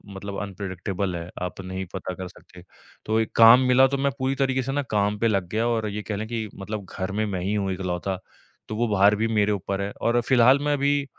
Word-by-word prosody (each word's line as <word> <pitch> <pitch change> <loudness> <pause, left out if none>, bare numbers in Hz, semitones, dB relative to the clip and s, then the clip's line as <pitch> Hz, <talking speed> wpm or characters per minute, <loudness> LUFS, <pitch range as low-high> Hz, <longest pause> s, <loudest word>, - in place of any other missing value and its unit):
मतलब 100 +1 -6
अनप्रेडिक्टेबल 95 -1 -4
है, 85 0 -6
आप 90 +1 -4
नहीं 95 +1 -5
पता 95 -1 -4
कर 90 0 -7
सकते। 90 0 -16 0.4
तो 110 +1 +1
एक 110 - -1
काम 115 +2 +9
मिला, 130 +1 +6
तो 140 - -2
मैं 140 0 +1
पूरी 130 +1 0
तरीके 130 -1 +1
से 135 - -3
ना 145 +1 0
काम 105 0 +1
पे 115 - +2
लग 100 -5 0
गया, 115 +2 +1
और 110 -2 0
ये 105 +1 -4
कह 105 0 -4
लें 110 +2 -4
कि 115 -1 -3
मतलब 100 +1 -6
घर 95 0 -2
में 110 +2 -1
मैं 95 -4 -3
ही 95 +3 -1
हूँ 100 -2 -1
इकलौता, 90 0 -3 0.5
तो 110 - -5
वो 120 +2 0
भार 100 +2 +5
भी 110 +2 0
मेरे 105 0 +2
ऊपर 100 -1 -2
है। 100 - -3
और 120 +1 +2
फिलहाल 130 +2 +5
मैं 145 0 0
अभी 140 0 +1
105 Hz, 240 wpm, -24 LUFS, 95-120 Hz, 0.5 s, काम